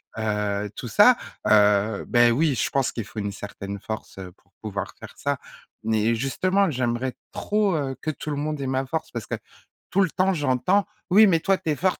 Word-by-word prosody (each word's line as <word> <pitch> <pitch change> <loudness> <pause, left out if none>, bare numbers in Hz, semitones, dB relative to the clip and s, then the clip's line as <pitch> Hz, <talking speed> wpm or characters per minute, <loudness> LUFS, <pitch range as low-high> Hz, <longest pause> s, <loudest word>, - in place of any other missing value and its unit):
heu, 110 - -4 0.4
heu, - - -5
tout 125 - -6
ça. 210 - +6 0.3
Heu, 105 0 +4
beh 120 -1 +5
oui, 145 +5 +2
je - - 0
pense 135 -2 0
qu'il 115 - -5
faut 105 - -15
une 100 -1 -2
certaine 100 0 -7
force, 110 -1 -7
heu, 90 -1 -8
pour 90 -1 -35
pouvoir 100 -2 -4
faire - - -11
ça. - - -1 0.4
Mais 110 +1 +2
justement, 185 - +1
j'aimerais 125 -2 -1 0.2
trop, 205 -1 0
heu, 135 -3 -2
que 155 - 0
tout 155 - -7
le 145 - -1
monde 150 0 -3
ait 135 - -2
ma 130 +1 0
force 160 +4 -3
parce 115 -3 -5
que - - -6 0.6
tout 195 - +2
le 185 -5 +2
temps 185 +1 +2
j'entends: 150 +6 +1 0.2
«Oui 205 +4 +7
mais 175 -5 +4
toi 195 +4 +2
tu 160 - -2
es - - +1
forte, 185 +4 0
135 Hz, 215 wpm, -24 LUFS, 110-175 Hz, 0.6 s, Oui